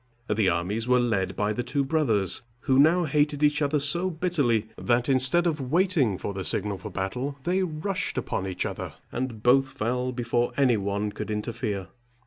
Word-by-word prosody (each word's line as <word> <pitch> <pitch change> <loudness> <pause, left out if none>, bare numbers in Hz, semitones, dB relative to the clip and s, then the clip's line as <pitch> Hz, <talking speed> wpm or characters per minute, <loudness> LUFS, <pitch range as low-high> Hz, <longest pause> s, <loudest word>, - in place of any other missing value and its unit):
The 105 -2 +2
armies 100 +7 -1
were 125 0 +4
led 95 -6 0
by 105 +1 0
the 125 - -2
two 140 +3 -1
brothers, 115 - +2 0.2
who 135 -2 +2
now 165 +5 +5
hated 150 -1 +1
each 150 +1 +3
other 145 +1 +1
so 170 +6 +2
bitterly, 150 - 0
that, 120 0 0
instead 135 +6 +3
of 160 -4 0
waiting 165 - +2
for 100 - -4
the 95 -1 -4
signal 100 +1 -1
for 105 - -7
battle, 125 +10 -3
they 180 +3 +1
rushed 185 +2 -3
upon 95 - -2
each 90 -1 -3
other, - - -5 0.2
and 120 -4 -4
both 135 +2 +5
fell 125 +2 -2
before 120 -1 -1
any 130 -4 +4
one 100 +1 -2
could - - -6
interfere. 105 -2 -3
125 Hz, 180 wpm, -26 LUFS, 105-150 Hz, 0.2 s, now